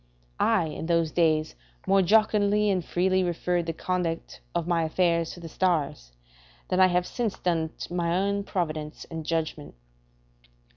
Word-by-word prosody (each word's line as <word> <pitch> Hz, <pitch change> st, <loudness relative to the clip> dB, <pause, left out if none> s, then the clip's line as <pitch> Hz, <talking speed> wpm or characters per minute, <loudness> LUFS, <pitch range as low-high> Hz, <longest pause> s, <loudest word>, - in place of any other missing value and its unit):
I, 215 Hz, -7 st, +3 dB
in 155 Hz, +1 st, -5 dB
those 165 Hz, -2 st, +2 dB
days, 155 Hz, -2 st, +2 dB, 0.3 s
more 195 Hz, 0 st, +4 dB
jocundly 210 Hz, +1 st, +3 dB
and 185 Hz, -3 st, 0 dB
freely 185 Hz, +2 st, +1 dB
referred 175 Hz, 0 st, -1 dB
the 165 Hz, -, -1 dB
conduct 175 Hz, -1 st, -3 dB
of 170 Hz, -2 st, 0 dB
my 170 Hz, -2 st, +2 dB
affairs 170 Hz, 0 st, +1 dB
to -, -, -11 dB
the 170 Hz, -, -8 dB
stars, 155 Hz, -, -1 dB, 0.6 s
than 185 Hz, -, +1 dB
I 185 Hz, -, +7 dB
have 180 Hz, 0 st, +1 dB
since 230 Hz, -1 st, -3 dB
done 165 Hz, -3 st, 0 dB
to -, -, -6 dB
my 170 Hz, 0 st, 0 dB
own 200 Hz, +1 st, 0 dB
providence 155 Hz, -5 st, -3 dB
and 165 Hz, -1 st, -5 dB
judgment. 155 Hz, -, -3 dB
175 Hz, 155 wpm, -27 LUFS, 165-185 Hz, 0.6 s, I